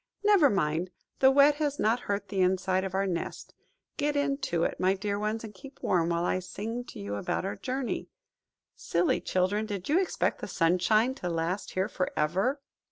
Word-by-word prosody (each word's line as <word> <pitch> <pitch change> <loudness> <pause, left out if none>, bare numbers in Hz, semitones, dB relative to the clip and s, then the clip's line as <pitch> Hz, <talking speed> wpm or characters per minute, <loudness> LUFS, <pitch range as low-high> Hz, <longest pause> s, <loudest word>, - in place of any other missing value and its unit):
Never 405 -8 +6
mind! 170 -2 0 0.3
the 265 - +7
wet 285 +2 +5
has 295 -2 -1
not 225 +3 +2
hurt 200 0 -1
the 195 -2 0
inside 185 0 +2
of 190 -1 -4
our 195 +1 +1
nest. 175 -3 -4 0.4
Get 295 0 0
into 275 - 0
it, - - -1
my 185 +1 +3
dear 200 +1 -2
ones, 215 +2 -2
and 215 -2 -8
keep 265 +8 -13
warm, 170 -2 +2
while 170 0 0
I 185 - +1
sing 225 +6 -5
to - - -10
you 100 0 -4
about 100 - -2
our 195 - -3
journey. 260 0 -3 0.7
Silly 170 +1 0
children, 200 +4 0
did 200 -1 -5
you 320 +5 +4
expect 375 - -1
the - - -4
sunshine 185 +8 +2
to 180 - -2
last 170 +4 -2
here 190 +1 0
for 185 -3 -2
ever?" 190 - +1
200 Hz, 190 wpm, -29 LUFS, 180-255 Hz, 0.7 s, the